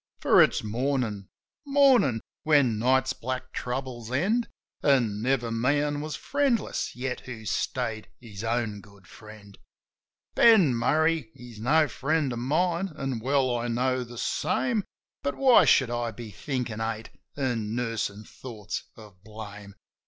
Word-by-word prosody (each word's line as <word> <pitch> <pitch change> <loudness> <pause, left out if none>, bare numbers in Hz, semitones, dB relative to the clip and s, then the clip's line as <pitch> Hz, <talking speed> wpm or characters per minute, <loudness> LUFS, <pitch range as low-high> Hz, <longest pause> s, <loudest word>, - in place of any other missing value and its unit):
For - - +5
it's - - +3
Mornin'! 115 -3 -2 0.4
Mornin'! 270 - +4 0.2
When 140 -8 +3
night's 130 +2 +2
black 130 +1 -5
troubles 125 -2 -4
end. 210 - +1 0.3
An' 120 -8 +2
never 120 -1 0
man 145 +5 0
was 155 -2 -4
friendless 270 - -1
yet 125 0 -3
who 115 -3 -9
stayed 110 +3 -2
his 110 -4 -9
own 115 -3 -1
good 100 -2 -19
friend. 105 0 -14 0.7
Ben 200 - +6
Murray, 155 +2 +1
he's 120 -4 -12
no 150 +7 +3
friend 145 -1 -1
of 120 - -4
mine, 170 +8 0
an' 135 -5 -3
well 130 +1 +1
I 120 0 -2
know 125 +2 0
the 120 0 -11
same; 225 - 0 0.4
But 140 - -2
why 260 -3 +6
should 130 -3 +4
I 120 -1 -1
be 115 0 -9
thinkin' 120 0 -4
hate, 110 0 -4 0.3
an' 115 -6 -1
nursin' 115 -3 -2
thoughts 110 -2 -7
of 105 -4 -15
blame 105 -2 -10
125 Hz, 135 wpm, -27 LUFS, 110-145 Hz, 0.7 s, Ben